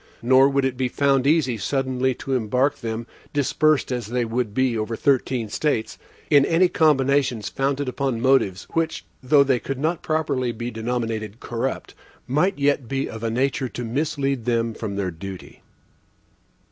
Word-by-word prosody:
Nor 130 +3 +6
would 140 -1 +1
it 130 -2 -2
be 130 0 0
found 135 +1 +2
easy 140 -7 +2
suddenly 130 +1 0
to 135 - -4
embark 125 +3 +1
them, 115 0 -4 0.3
dispersed 145 +1 +2
as 120 -4 -3
they 120 +1 -1
would 115 -1 -2
be 130 +2 +1
over 110 +1 -2
thirteen 130 -3 +1
States, 115 +1 -2 0.3
in 145 -1 +7
any 165 +5 +4
combinations 140 - +2
founded 140 +1 -1
upon 130 -2 -1
motives, 125 -7 +2
which 165 -1 -1 0.2
though 140 +2 +5
they 130 -3 +1
could 135 +2 -4
not 160 +5 -1
properly 145 -6 -1
be 120 +2 -5
denominated 115 -2 -3
corrupt, 120 +3 -4 0.3
might 155 +9 +1
yet 140 -3 +1
be 135 +2 -2
of 110 0 -8
a 115 - 0
nature 130 +3 0
to 120 - -5
mislead 135 0 -1
them 115 -1 0
from 105 -3 -5
their 95 -2 -2
duty. 95 +3 -9
130 Hz, 160 wpm, -23 LUFS, 115-140 Hz, 0.3 s, in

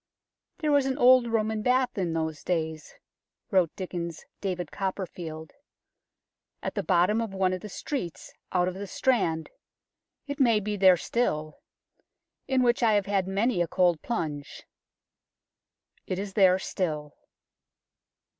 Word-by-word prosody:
There 310 -4 0
was 285 -2 +3
an 265 0 -1
old 255 -2 +6
Roman 220 -1 0
Bath 250 +2 +2
in 180 -4 -1
those 160 -2 -3
days," 160 -3 -3 0.6
wrote 185 -4 +4
Dickens 170 -3 -5
's - - -21 0.2
David 180 -5 -3
Copperfield, 175 -5 -5 0.5
" - - -52
at - - -3
the - - -1
bottom 185 +5 +2
of 215 -4 -4
one 190 -1 +2
of 185 - -4
the 210 - -8
streets 185 - -5 0.2
out 180 -1 +2
of 185 - -2
the 200 +2 -6
Strand 180 -9 0 0.7
it 285 0 -5
may 235 -5 +4
be 210 0 -3
there 190 -2 +6
still 155 -8 -1 0.9
in 260 -1 +2
which 240 0 +2
I 225 -2 +4
have 205 -2 +2
had 195 -2 0
many 200 +1 +1
a 175 - +1
cold 175 -2 +2
plunge." 150 -11 -4 1.4
It 185 - -2
is 195 0 -5
there 190 -2 +5
still. 155 -6 -3
190 Hz, 145 wpm, -27 LUFS, 170-225 Hz, 1.4 s, old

